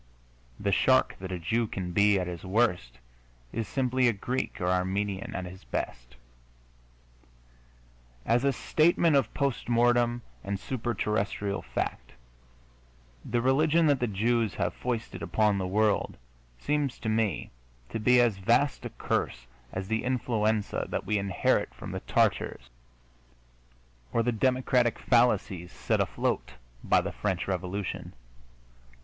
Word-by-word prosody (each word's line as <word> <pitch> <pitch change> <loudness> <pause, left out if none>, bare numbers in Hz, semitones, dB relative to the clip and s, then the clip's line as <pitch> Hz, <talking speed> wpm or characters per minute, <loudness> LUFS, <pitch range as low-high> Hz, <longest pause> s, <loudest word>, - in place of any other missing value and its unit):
The - - 0
shark 65 -1 +3
that 95 0 -6
a 90 - -2
Jew 115 +7 0
can 90 -3 -4
be 100 +2 +4
at 90 - -1
his 90 -1 -6
worst 95 - 0 0.6
is 115 -1 -2
simply 130 -1 +1
a 120 - +3
Greek 125 +6 -3
or 90 - -2
Armenian 95 +2 -1
at 90 - -3
his 90 +1 -10
best. - - -5 2.1
As 120 +2 +2
a 140 - +3
statement 160 +2 +3
of 135 - +2
post 140 -4 -1
mortem 120 0 +3 0.2
and 100 0 -3
super 120 0 -3
terrestrial 100 -1 -1
fact, - - -4 1.1
the 120 0 -1
religion 155 +5 +3
that 145 -3 +3
the 120 - 0
Jews 110 +1 +1
have - - -1
foisted 120 -2 -4
upon 105 -2 +1
the 95 - -2
world 105 +2 +1 0.4
seems 145 - -1
to 115 - -6
me 110 -4 0 0.4
to - - -3
be 125 +3 +5
as 115 -5 +3
vast 120 +8 +2
a - - -3
curse - - -2 0.3
as 95 0 -4
the 110 +1 -1
influenza 110 -4 0
that - - -3
we 105 -1 +1
inherit 95 -10 0
from - - -8
the - - -3
Tatars - - 0 1.4
or 115 - +2
the 120 - +1
democratic 125 0 +2
fallacies 105 -7 +2
set - - -1
afloat - - -1 0.3
by - - +4
the - - -4
French 95 -4 -2
Revolution. 95 +1 -3
110 Hz, 140 wpm, -28 LUFS, 95-120 Hz, 2.1 s, be